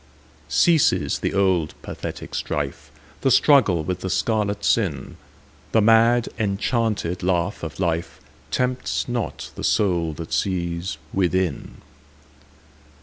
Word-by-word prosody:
Ceases 165 -4 +3
the - - -1
old 95 -5 +1
pathetic - - -7
strife, - - -3 0.3
The 135 - +2
struggle 115 - +4
with 90 +3 -3
the 95 - -4
scarlet 105 0 0
sin:The 100 - -2
mad 115 +2 +4
enchanted 105 -3 -1
laugh 90 +1 0
of 80 -2 -6
lifeTempts 95 +8 -3
not 120 -2 -4
the - - -8
soul 85 -6 +1
that 80 +1 -7
sees 85 -2 -1 0.2
within. 95 -4 -1
95 Hz, 100 wpm, -23 LUFS, 85-115 Hz, 0.3 s, struggle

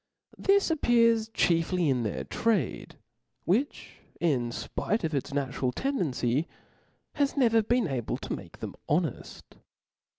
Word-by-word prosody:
Thi§ 395 -3 +3
appears 230 -6 +3
chiefly 175 -3 +1
in 130 -3 +2
their 110 -3 -2
trade, 200 -7 -1 0.5
which, 245 - -1 0.2
in 135 -8 +1
fpite 210 - -2
of 160 -1 -1
its 140 +1 -2
natural 135 -2 -1
tendency, 155 - -1 0.7
has 285 0 0
never 230 -4 +4
been 240 0 +1
able 130 -6 -2
to - - -5
make - - -9
them - - -5
honeft. - - -2
175 Hz, 125 wpm, -28 LUFS, -, 0.7 s, never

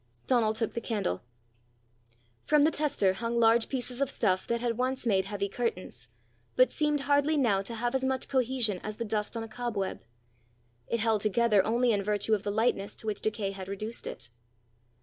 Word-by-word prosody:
Donal 230 -4 +3
took 220 0 -2
the 235 - -3
candle. 205 - -2 1.3
From 300 -1 +5
the 315 - +4
tester 285 -12 +1
hung 230 +4 -2
large 225 0 +4
pieces 255 -1 -3
of 275 - +2
stuff 185 -8 0
that 235 0 0
had 235 -1 -1
once 255 +2 -1
made 195 -4 +2
heavy 200 0 -2
curtains, 195 - -4 0.5
but 255 - +5
seemed 300 -2 +1
hardly 285 +2 +2
now 220 -8 +3
to 230 +4 -5
have 240 +2 -1
as 265 0 0
much 265 0 +1
cohesion 250 -6 +1
as 215 0 -6
the 235 - -3
dust 215 +1 -2
on 225 - -3
a - - -6
cobweb; 220 -4 -3 0.9
it 235 - -1
held 220 -2 +2
together 215 -1 +3
only 235 +2 +2
in 205 -2 +1
virtue 210 +2 +1
of 210 - +2
the 205 - -3
lightness 210 -1 0
to - - -10
which 210 -2 -2
decay 210 -2 -1
had 190 -1 -7
reduced 215 +4 -5
it. 120 - -6
225 Hz, 190 wpm, -29 LUFS, 205-250 Hz, 1.3 s, From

